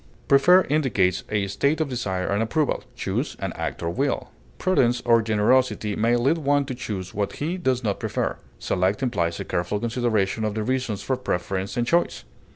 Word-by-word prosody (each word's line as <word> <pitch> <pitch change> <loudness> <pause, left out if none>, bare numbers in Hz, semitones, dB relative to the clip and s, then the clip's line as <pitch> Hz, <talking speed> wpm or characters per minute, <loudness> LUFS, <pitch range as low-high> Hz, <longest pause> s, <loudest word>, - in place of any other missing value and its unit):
Prefer 180 +7 +6
indicates 115 - +1
a 105 -2 0
state 140 +11 0
of 160 - +1
desire 100 -8 -2
and 100 +2 0
approval; 150 +6 0
choose, - - -2
an - - -3
act - - -4
of 85 +1 -3
will. - - -1 0.3
Prudence 125 -10 +2
or 115 -1 +5
generosity 110 0 +2
may 115 +2 +2
lead 135 +7 +2
one 145 -1 +2
to 135 - -4
choose 100 -6 -5
what 100 0 -2
he 160 +5 -2
does 130 -9 0
not 100 -3 -1
prefer. - - -2 0.2
Select 95 +7 0
implies 85 -9 0
a - - -4
careful 90 +4 -1
consideration 110 -3 0
of 105 -1 -1
the 110 - -1
reasons 125 -4 -2
for 130 - 0
preference 95 -2 -3
and 120 - +1
choice. 170 +7 +1
115 Hz, 180 wpm, -24 LUFS, 100-135 Hz, 0.3 s, Prefer